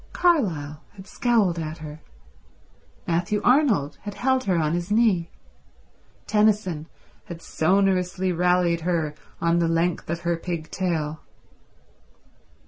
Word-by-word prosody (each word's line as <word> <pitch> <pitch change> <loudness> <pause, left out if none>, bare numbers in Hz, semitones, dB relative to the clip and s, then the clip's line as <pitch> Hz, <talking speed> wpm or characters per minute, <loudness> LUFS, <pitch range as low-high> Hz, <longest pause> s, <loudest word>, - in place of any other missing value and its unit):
Carlyle 170 - +1
had 190 -1 -11
scowled 205 -5 +1
at 155 0 -5
her; 155 0 -9 1.1
Matthew 175 +5 0
Arnold 245 - +3
had 205 -1 -7
held 260 0 +1
her 185 - +2
on 155 -1 +1
his 175 +2 -2
knee; 210 -6 +2 1.0
Tennyson 210 -7 +1 0.4
had 170 -1 -8
sonorously 185 +2 +1
rallied 180 -1 +2
her 165 -3 -1 0.3
on 170 0 +2
the 170 - +2
length 165 0 0
of 170 +1 -2
her 170 -1 0
pig 165 -2 -5
tail. 160 -5 -2
175 Hz, 120 wpm, -24 LUFS, 165-200 Hz, 1.1 s, Arnold